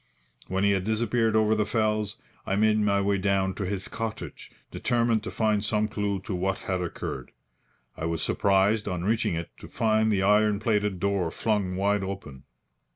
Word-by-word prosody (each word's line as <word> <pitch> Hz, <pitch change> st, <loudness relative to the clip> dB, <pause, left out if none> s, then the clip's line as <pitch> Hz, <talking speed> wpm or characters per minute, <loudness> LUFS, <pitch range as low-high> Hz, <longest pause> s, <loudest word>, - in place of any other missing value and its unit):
When 95 Hz, +1 st, -1 dB
he 100 Hz, -, +4 dB
had 95 Hz, -2 st, +1 dB
disappeared 110 Hz, +1 st, +1 dB
over 110 Hz, 0 st, +4 dB
the 110 Hz, -1 st, +2 dB
fells, 105 Hz, -1 st, 0 dB, 0.3 s
I 95 Hz, -, -1 dB
made 110 Hz, +1 st, +3 dB
my 100 Hz, -1 st, +2 dB
way 100 Hz, 0 st, +1 dB
down 95 Hz, 0 st, +1 dB
to 100 Hz, -1 st, -4 dB
his 100 Hz, 0 st, -3 dB
cottage, 115 Hz, -1 st, -6 dB, 0.2 s
determined 115 Hz, -2 st, +1 dB
to 110 Hz, -, -6 dB
find 105 Hz, -2 st, +1 dB
some 105 Hz, 0 st, +1 dB
clue 105 Hz, -2 st, -2 dB
to 100 Hz, -, -5 dB
what 95 Hz, +2 st, -1 dB
had 95 Hz, -1 st, -1 dB
occurred. 85 Hz, -, -5 dB, 0.6 s
I 80 Hz, -, -4 dB
was 85 Hz, -1 st, -1 dB
surprised, 100 Hz, +2 st, +2 dB
on 90 Hz, -3 st, -2 dB
reaching 110 Hz, -3 st, +1 dB
it, 85 Hz, 0 st, -5 dB
to -, -, -10 dB
find 110 Hz, -1 st, +1 dB
the 95 Hz, -2 st, +1 dB
iron 105 Hz, +1 st, +3 dB
plated 105 Hz, -3 st, 0 dB
door 100 Hz, -2 st, 0 dB
flung 100 Hz, 0 st, -1 dB
wide 100 Hz, +1 st, +1 dB
open. 95 Hz, -9 st, -7 dB
100 Hz, 180 wpm, -27 LUFS, 95-110 Hz, 0.6 s, he